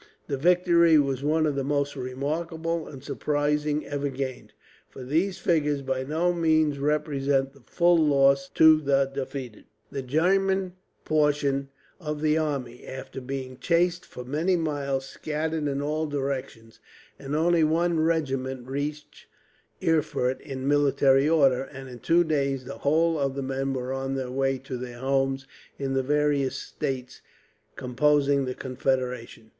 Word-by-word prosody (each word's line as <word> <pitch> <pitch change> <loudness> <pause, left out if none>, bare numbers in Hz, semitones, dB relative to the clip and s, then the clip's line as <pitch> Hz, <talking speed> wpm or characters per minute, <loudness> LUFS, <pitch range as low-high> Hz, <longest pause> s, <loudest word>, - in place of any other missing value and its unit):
The 140 - -2
victory 170 +1 +4
was 135 -3 +1
one 155 +2 +2
of 150 - +1
the 135 0 -2
most 140 +1 -1
remarkable 160 +5 -3
and 135 -2 -10
surprising 150 +1 -1
ever 145 0 -2
gained, 130 -1 -5 0.4
for 130 - -10
these 165 +9 0
figures 150 -4 +1
by 130 -1 -1
no 160 +6 0
means 155 -4 +2
represent 140 -2 0
the 140 - -18
full 175 0 +3
loss 140 -2 +3
to 160 -1 +7
the 140 -1 +3
defeated. 135 -4 -6 0.3
The 140 - -3
German 185 +7 +1 0.3
portion 145 -3 +1 0.3
of 150 -3 -4
the 155 0 +2
army, 140 -6 -3
after 130 0 -7
being 130 0 -6
chased 175 +4 +1
for 125 - -10
many 160 +8 +1
miles, 140 -5 -1
scattered 155 +2 -3
in 140 0 -2
all 155 +2 -1
directions; 135 -5 -4 0.4
and 140 +1 -4
only 165 +1 +3
one 165 +2 +2
regiment 135 -6 -1
reached 145 +3 -5 0.6
Erfurt 140 -5 +1
in 135 -1 -5
military 140 -1 +4
order, 135 -6 +4
and 135 -1 -10
in 125 -1 -10
two 170 +6 +3
days 140 -5 -1
the 135 - -8
whole 160 +2 +2
of 135 -1 -1
the 140 - -3
men 135 +1 -2
were 130 0 -3
on 135 0 -3
their 130 -2 -3
way 135 0 0
to 130 0 -6
their 120 -1 -7
homes, 135 +1 0 0.3
in 135 -1 -2
the 135 - +2
various 145 0 +1
states 130 -2 -5 0.5
composing 140 +2 +2
the 130 0 -4
Confederation. 125 -3 -3
140 Hz, 150 wpm, -26 LUFS, 135-155 Hz, 0.6 s, to